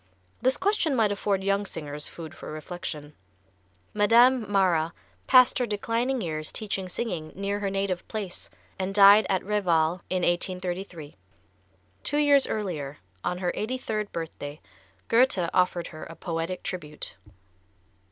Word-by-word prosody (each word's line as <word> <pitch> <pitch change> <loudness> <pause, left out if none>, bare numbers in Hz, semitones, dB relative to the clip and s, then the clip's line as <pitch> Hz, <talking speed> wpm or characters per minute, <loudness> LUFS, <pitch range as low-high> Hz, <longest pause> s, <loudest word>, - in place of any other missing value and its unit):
This 260 +1 +2
question 385 -8 +1
might 220 -4 +3
afford 200 -1 0
young 200 +1 +1
singers 150 -6 -6
food 160 -3 -9
for - - -9
reflection. 155 -2 -6 0.8
Madame 230 +2 +5
Mara 170 -5 +2 0.3
passed 255 -1 +6
her 245 - +1
declining 230 +4 -1
years 155 -3 -3
teaching 195 -3 -3
singing 175 -7 -4
near 200 +1 -2
her 200 -1 -1
native 195 -2 -2
place, 205 -5 -6 0.3
and 190 +1 -2
died 205 0 +8
at 190 -2 0
Reval, 175 -4 +1
in 185 -1 0
1833. 175 - -2 0.8
Two 290 - 0
years 285 -2 +5
earlier, 155 -9 -3 0.3
on 180 - -1
her 180 -1 -1
eighty 245 +5 -2
third 215 -4 -3
birthday, 155 -3 -6 0.5
Goethe 230 -7 +4
offered 180 -2 +2
her 155 -1 -9
a 165 - -10
poetic 170 +1 -4
tribute. 150 -5 -6
190 Hz, 135 wpm, -27 LUFS, 170-215 Hz, 0.8 s, died